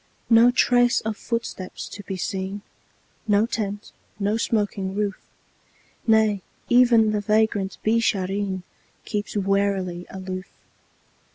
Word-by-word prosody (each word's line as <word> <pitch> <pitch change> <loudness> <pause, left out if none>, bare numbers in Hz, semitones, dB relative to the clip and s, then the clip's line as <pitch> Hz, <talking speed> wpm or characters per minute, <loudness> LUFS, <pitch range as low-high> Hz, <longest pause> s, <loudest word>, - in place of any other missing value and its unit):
No 230 +1 +7
trace 245 -1 +3
of 220 0 -3
footsteps 230 -5 -5
to 205 - -8
be 190 -1 -5
seen, 190 +2 -4 0.6
No 205 +1 +4
tent, 210 -3 -4 0.3
no 205 +1 +1
smoking 205 -4 -1
roof; 205 -2 -1 0.9
Nay, 220 -3 +4 0.3
even 240 -3 +5
the 210 -1 0
vagrant 210 -2 +1
Beeshareen 200 -4 0 0.4
Keeps 210 0 -3
warily 195 -3 0
aloof. 185 0 -6
205 Hz, 105 wpm, -24 LUFS, 195-220 Hz, 0.9 s, No